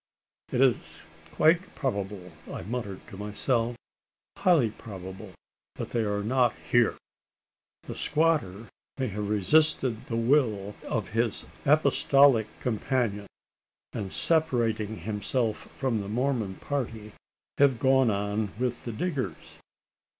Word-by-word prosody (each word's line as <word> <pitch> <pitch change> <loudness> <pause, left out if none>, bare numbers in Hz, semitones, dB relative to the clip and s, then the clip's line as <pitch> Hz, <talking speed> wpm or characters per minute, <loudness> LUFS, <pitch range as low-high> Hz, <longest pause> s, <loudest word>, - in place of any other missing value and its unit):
"It 125 - +1
is 130 -3 +1 0.3
quite 170 +4 +3
probable," 100 - -3 0.2
I - - -5
muttered 105 -2 -5
to 95 - -10
myself, 115 +3 -1 0.6
"highly 155 - +3
probable 95 -3 -9 0.4
that - - -6
they 120 - +1
are 105 -1 -1
not 125 +1 +2 0.2
here! 120 -2 +4 0.9
The - - -6
squatter 145 - +1 0.3
may 130 -3 -1
have 105 +1 -3
resisted 120 +2 +2
the 115 - -3
will 115 -5 +2
of 110 -6 -2
his 115 0 -1 0.2
Apostolic 140 -5 +5
companion; 110 -3 -1 0.7
and, 100 -3 -4
separating 120 -9 +1
himself 110 +4 -2
from 125 -6 0
the 100 - -6
Mormon 120 -4 -1
party, 115 -6 -4 0.5
have 140 -3 +5
gone 130 0 +4
on 105 0 -1
with 125 0 -2
the 120 - -3
diggers? 140 +3 -4
115 Hz, 115 wpm, -28 LUFS, 105-130 Hz, 0.9 s, Apostolic